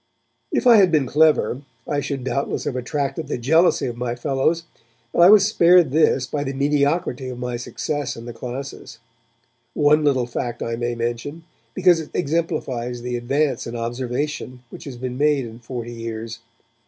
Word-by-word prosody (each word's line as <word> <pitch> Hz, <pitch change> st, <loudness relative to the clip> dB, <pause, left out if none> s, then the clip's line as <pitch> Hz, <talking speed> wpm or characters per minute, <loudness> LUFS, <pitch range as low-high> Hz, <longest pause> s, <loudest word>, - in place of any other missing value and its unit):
If -, -, 0 dB
I 240 Hz, -2 st, +8 dB
had 190 Hz, -4 st, +5 dB
been 150 Hz, -4 st, +3 dB
clever, 145 Hz, -3 st, +2 dB, 0.3 s
I 145 Hz, -, 0 dB
should 140 Hz, -2 st, -4 dB
doubtless 135 Hz, +2 st, -2 dB
have -, -, -3 dB
attracted 140 Hz, +3 st, -3 dB
the -, -, -2 dB
jealousy 160 Hz, +9 st, +3 dB
of 120 Hz, -, -3 dB
my 120 Hz, 0 st, -2 dB
fellows, 140 Hz, +6 st, 0 dB, 0.5 s
but -, -, -1 dB
I 175 Hz, -, +9 dB
was 205 Hz, -1 st, +7 dB
spared 175 Hz, -7 st, +5 dB
this 140 Hz, -3 st, +3 dB
by 145 Hz, +1 st, -3 dB
the 135 Hz, -1 st, -3 dB
mediocrity 140 Hz, -1 st, 0 dB
of 125 Hz, -, -6 dB
my 125 Hz, 0 st, -3 dB
success 145 Hz, +4 st, -4 dB
in 115 Hz, -, -9 dB
the 120 Hz, -, -7 dB
classes. 130 Hz, +3 st, -7 dB, 0.8 s
One 150 Hz, +1 st, +4 dB
little 135 Hz, -4 st, +2 dB
fact 120 Hz, 0 st, -4 dB
I 115 Hz, -, -2 dB
may 120 Hz, 0 st, -2 dB
mention, 120 Hz, +7 st, -4 dB, 0.3 s
because 180 Hz, -3 st, +4 dB
it 155 Hz, -, -7 dB
exemplifies 130 Hz, -6 st, -2 dB
the 125 Hz, 0 st, -3 dB
advance 135 Hz, +2 st, -1 dB
in 115 Hz, -, -6 dB
observation 125 Hz, +2 st, -4 dB
which -, -, -10 dB
has 135 Hz, -4 st, -7 dB
been 125 Hz, +1 st, -5 dB
made 145 Hz, -3 st, +2 dB
in 115 Hz, 0 st, -10 dB
forty 120 Hz, -1 st, -6 dB
years. 115 Hz, 0 st, -6 dB
135 Hz, 175 wpm, -22 LUFS, 120-150 Hz, 0.8 s, I